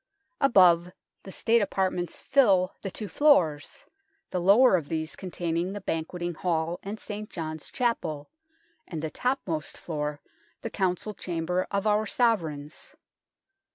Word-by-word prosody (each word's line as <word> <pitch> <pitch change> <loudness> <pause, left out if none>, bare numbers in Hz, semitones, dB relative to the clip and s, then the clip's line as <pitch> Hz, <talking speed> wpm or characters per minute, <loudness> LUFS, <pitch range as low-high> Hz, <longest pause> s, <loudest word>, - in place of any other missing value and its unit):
Above, 180 -9 +5 0.3
the 190 - -10
State 230 +4 +2
apartments 185 -3 -1
fill 200 -10 +3
the 195 - -4
two 210 +3 -6
floors, 180 - +2 0.5
the 180 - -1
lower 205 +5 +6
of 160 -5 -2
these 160 -1 -2
containing 175 0 -3
the 205 - -5
Banqueting 175 +1 -3
Hall 165 0 -1
and 205 +2 -6
St. 210 0 -6
John's 155 -2 -5
Chapel, 170 - -2 0.6
and 160 -3 -5
the 160 - -3
topmost 195 - -2
floor 150 -2 -4 0.4
the - - -4
Council 190 +2 -1
Chamber 180 -1 -2
of 200 +1 -1
our 215 0 +2
Sovereigns. 165 - -1
180 Hz, 130 wpm, -27 LUFS, 160-210 Hz, 0.6 s, lower